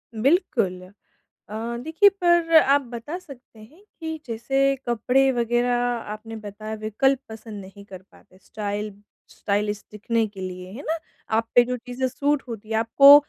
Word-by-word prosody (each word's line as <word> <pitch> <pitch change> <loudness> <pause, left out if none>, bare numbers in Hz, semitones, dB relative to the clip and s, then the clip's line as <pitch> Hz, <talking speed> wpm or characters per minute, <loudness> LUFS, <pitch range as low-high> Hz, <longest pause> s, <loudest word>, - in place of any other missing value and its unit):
बिल्कुल। 215 - +2 0.7
अ, 225 +3 -4
देखिए 325 +7 +5
पर 345 -4 +2
आप 280 -2 +5
बता 245 +6 -6
सकते 265 -9 -14
हैं 300 - -16 0.2
कि 320 -1 -4
जैसे 270 +4 +1
कपड़े 250 +3 +3
वगैरह 240 0 +1 0.4
आपने 225 +1 -8
बताया 215 0 -7
विकल्प 270 +5 +2
पसंद 220 -2 -8
नहीं 195 +1 -12
कर 190 -2 -10
पाते 185 -2 -21
स्टाइल 210 0 -4 0.4
स्टाइलिश 205 0 -1
दिखने 225 +2 0
के 200 -2 -13
लिए 185 0 -6
है 250 +7 -8
ना? 325 - 0 0.3
आप 225 +1 +1
पे 245 - +8
जो 250 - -2
चीज़ें 250 +2 -3
सूट 285 +2 0
होती 220 -2 -8
हैं 220 - -1
आपको 275 +6 +8
230 Hz, 155 wpm, -24 LUFS, 215-275 Hz, 0.7 s, पे